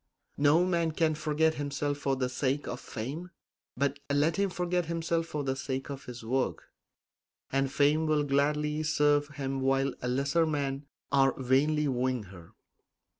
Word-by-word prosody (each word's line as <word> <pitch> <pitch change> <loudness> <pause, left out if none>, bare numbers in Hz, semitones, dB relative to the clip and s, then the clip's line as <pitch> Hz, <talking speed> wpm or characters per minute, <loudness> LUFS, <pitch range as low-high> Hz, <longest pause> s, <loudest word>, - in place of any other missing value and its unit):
No 150 +5 +5
man 170 -3 +1
can 155 0 +2
forget 155 +1 +1
himself 145 0 -2
for 135 -1 0
the 130 -1 0
sake 130 +3 -1
of 125 - -4
fame; 145 +11 -6 0.5
but 140 +1 0
let 150 +3 +2
him 200 0 +2
forget 180 -1 -1
himself 165 0 -1
for 150 -3 -3
the 135 -1 -1
sake 135 +1 -4
of 140 -1 -7
his 120 -1 -8
work, 130 +3 -1 0.9
and 135 0 +1
fame 150 +3 +3
will 155 -1 +2
gladly 150 +2 +1
serve 150 -1 +2
him 135 -2 -4
while 135 0 +2
lesser 140 +6 +1
men 140 -2 -2 0.2
are 135 -2 +3
vainly 145 +4 +2
wooing 130 -2 0
her. 90 -3 -14
145 Hz, 155 wpm, -30 LUFS, 135-155 Hz, 0.9 s, No